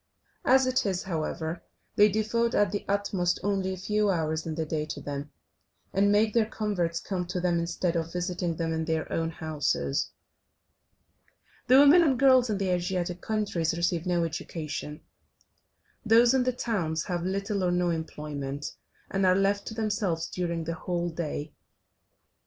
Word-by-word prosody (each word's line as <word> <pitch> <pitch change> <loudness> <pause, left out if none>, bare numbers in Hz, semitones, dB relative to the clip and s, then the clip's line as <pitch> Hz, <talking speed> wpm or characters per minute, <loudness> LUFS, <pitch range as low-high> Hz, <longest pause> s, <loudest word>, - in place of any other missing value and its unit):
As 265 0 +5
it 255 0 +1
is, 190 -3 -1
however, 160 -1 -3 0.3
they 210 +1 +6
devote 220 +3 0
at 205 -3 +3
the 205 - -3
utmost 195 -3 0
only 195 -1 0
a 190 - -4
few 210 +3 +1
hours 160 -3 -1
in 160 - -3
the 160 0 -2
day 155 0 -2
to - - -5
them, 145 0 -5 0.6
and 200 +1 +3
make 210 +1 +3
their 230 -2 +3
converts 190 -7 -1
come 180 -3 -3
to 180 +1 -2
them, 175 -1 +1
instead 170 +1 -1
of 165 0 -2
visiting 180 -1 -2
them 165 0 -2
in 160 0 -1
their 160 -1 -1
own 165 0 0
houses. 150 - -1 1.6
The 255 +2 +7
women 290 +5 +8
and 280 -6 +3
girls 260 -2 +5
in 210 - 0
the 195 -1 -1
Asiatic 180 0 -1
countries 185 -7 -1
receive 170 0 0
no 175 -1 +2
education, 155 -2 -5 1.0
those 235 +2 +5
in 260 -2 +2
the 255 - +2
towns 180 -10 -1
have 175 -2 -2
little 195 +2 -1
or 180 - +2
no 175 0 +1
employment, 145 -3 -4 0.4
and 195 0 0
are 185 -1 +5
left 200 +1 +1
to 220 - -5
themselves 205 -7 -1
during 170 -2 -2
the 165 +1 -3
whole 175 +1 -2
day. 155 -2 -4
180 Hz, 165 wpm, -28 LUFS, 165-205 Hz, 1.6 s, women